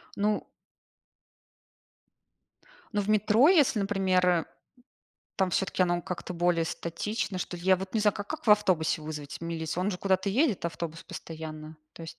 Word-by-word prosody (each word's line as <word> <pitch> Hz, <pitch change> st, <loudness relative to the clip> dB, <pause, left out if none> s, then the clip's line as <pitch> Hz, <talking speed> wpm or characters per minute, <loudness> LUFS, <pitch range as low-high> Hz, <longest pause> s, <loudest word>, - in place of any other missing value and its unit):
Ну 210 Hz, +1 st, 0 dB, 2.5 s
ну, 205 Hz, -, +1 dB
в 200 Hz, -, -4 dB
метро, 215 Hz, +6 st, +5 dB
если, 295 Hz, -, +4 dB
например, 185 Hz, -4 st, +2 dB, 0.9 s
там 190 Hz, -1 st, +1 dB
всё-таки 190 Hz, 0 st, +1 dB
оно 175 Hz, -1 st, +1 dB
как-то 180 Hz, +1 st, -5 dB
более 175 Hz, -1 st, +2 dB
статично, 185 Hz, +5 st, -3 dB
что 180 Hz, 0 st, -4 dB
ли, 170 Hz, -, -11 dB
я 190 Hz, 0 st, +5 dB
вот 190 Hz, +2 st, -7 dB
не 220 Hz, -, +2 dB
знаю, 210 Hz, -1 st, +3 dB
ка 205 Hz, -, -5 dB
как 310 Hz, +5 st, -7 dB
в -, -, +5 dB
автобусе 185 Hz, -7 st, +3 dB
вызвать 150 Hz, -2 st, -7 dB
милицию, 165 Hz, +1 st, -3 dB
он 205 Hz, -, +1 dB
же 180 Hz, -, -4 dB
куда-то 190 Hz, 0 st, +1 dB
едет 235 Hz, -, +1 dB
автобус 165 Hz, 0 st, -4 dB
постоянно 155 Hz, -2 st, -8 dB, 0.2 s
то -, -, -10 dB
есть. 165 Hz, -, -9 dB
185 Hz, 160 wpm, -28 LUFS, 165-205 Hz, 2.5 s, метро